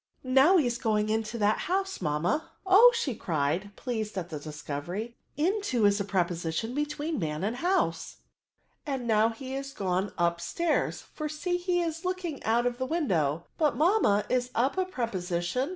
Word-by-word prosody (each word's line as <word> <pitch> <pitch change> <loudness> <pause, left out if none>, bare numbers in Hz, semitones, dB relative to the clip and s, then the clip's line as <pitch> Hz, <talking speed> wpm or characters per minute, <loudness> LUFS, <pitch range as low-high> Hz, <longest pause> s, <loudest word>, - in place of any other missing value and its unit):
Now 270 +8 +5
he 310 - +3
is 240 -1 -1
going 215 -2 +1
into 220 +1 -1
that 210 0 +2
house, 385 - -1
mamma* 170 - 0 0.2
Oh!" 410 +6 +8 0.3
cried 155 +1 0
she, 205 - -13
pleased 220 -5 -4
at 175 -2 -3
the 155 - -5
discovery, 155 +9 -5 0.2
into 330 - +1
is 205 0 +4
a - - 0
preposition 175 +2 -1
between 295 +1 -2
man 155 -1 -2
and 220 +4 -1
house; 365 +7 0 0.7
and 270 -4 -3
now 220 -1 +4
he 260 +3 -7
is 275 0 -5
gone 190 -1 -1
up 170 -1 +1
stairs, 315 - -1
for 305 -1 -6
see, 355 +4 -1
he 355 0 0
is 330 +1 -4
looking 365 -5 -3
out 235 +2 +2
of 245 0 -1
the 260 - -1
window* 175 - 0
But, 305 -3 +3
mamma^ 310 - +3
is 250 -1 +1
«p - - -28
a 255 +3 +4 0.2
preposition? 215 - -2
235 Hz, 170 wpm, -28 LUFS, 185-305 Hz, 0.7 s, Oh